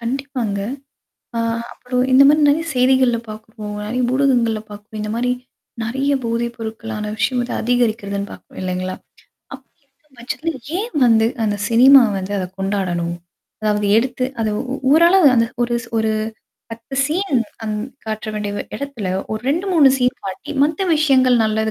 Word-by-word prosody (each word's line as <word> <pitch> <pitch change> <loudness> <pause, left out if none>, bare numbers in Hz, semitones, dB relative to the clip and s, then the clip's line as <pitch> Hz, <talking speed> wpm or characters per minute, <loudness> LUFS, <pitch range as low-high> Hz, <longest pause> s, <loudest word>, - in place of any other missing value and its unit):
கண்டிப்பாங்க. 245 -4 -3 0.8
ஆ - - 0 0.3
அப்புறம் 250 0 -2
இந்த 260 +2 +8
மாரி 300 +1 +4
நெறைய 305 +3 +2
செய்திகள்ல 255 -1 +3
பாார்க்குறோம். 215 -1 -8
நறைய 245 +4 -2
ஊடகங்கள்ல 245 -5 +2
பார்க்குறோம். 210 +1 -10
இந்த 210 0 -3
மாரி 245 +2 0 0.5
நெறைய 265 +5 -1
போதை 230 +1 -1
பொருட்களான 220 -1 -5
விஷயம் 220 +4 0
வந்து 240 - -3
அதிகரிக்கிறதுன்னு 220 -4 0
பார்க்குறோம் - - -12
இல்லைங்களா? 185 0 -3 0.6
அப்படி 270 0 -15
இருக்கும் 270 0 -32
பட்சத்துல 295 +7 -3 0.3
ஏன் 425 -4 -4
வந்து 225 -1 +4 0.2
அந்த 205 -1 0
சினிமா 260 +4 +7
வந்து 190 +1 -4
அத 185 - -2
கொண்டாடணும்? 185 -3 -1 0.5
அதாவது 210 -1 +1
எடுத்து 255 +1 -1 0.2
அத 220 - +1 0.2
உ - - -1 0.2
ஊரள 335 +5 +6 0.2
அந்த 230 0 +4 0.2
ஒருஸ் 235 -1 -1
ஒரு 220 0 +1 0.6
10 230 +4 -8
சீன் 320 -1 0 0.3
அந் 215 -1 -2 0.3
காட்டுற 220 0 -4
வேண்டிய 210 -1 -3 0.2
இடத்துல 275 -8 -5 0.2
ஒரு 215 - -4
2-3 335 -2 +4
சீன் 250 0 +1
காட்டி 195 +9 -6
மத்த 310 +5 -1
விஷயங்கள் 260 -5 +4
நல்லது 220 0 0
235 Hz, 145 wpm, -19 LUFS, 215-265 Hz, 0.8 s, இந்த